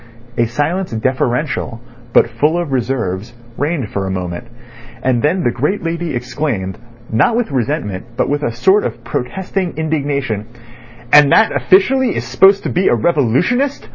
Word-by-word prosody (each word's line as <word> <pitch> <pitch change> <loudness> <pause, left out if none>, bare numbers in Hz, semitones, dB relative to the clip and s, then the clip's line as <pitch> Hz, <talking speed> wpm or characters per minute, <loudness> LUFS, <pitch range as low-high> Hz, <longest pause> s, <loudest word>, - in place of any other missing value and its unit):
A 115 - +2
silence 160 +10 -1
deferential, 125 +1 -1 0.3
but - - +5
full 155 +5 +3
of 170 -5 -3
reserves, 115 -5 -2 0.2
reigned 145 -6 -2
for 95 -1 -2
a - - -2
moment, 90 +4 -4 0.6
and 125 -2 +1
then 175 +6 +1
the 120 - +2
great 150 - -1
lady 165 -2 -2
exclaimed, 120 -6 -3 0.3
not 130 - +3
with 240 -8 -1
resentment, 125 - -2
but - - +1
with 145 +1 -1
a 120 - -1
sort 190 - +3
of - - -5
protesting 185 +5 -3
indignation: 140 -9 -2 0.7
"And 145 -2 +7
that 220 - +4
officially 245 +8 +3
is 115 - -3
supposed 190 +11 +4
to - - -2
be 185 - +1
a - - +4
revolutionist! 170 - +1
140 Hz, 155 wpm, -16 LUFS, 120-175 Hz, 0.7 s, And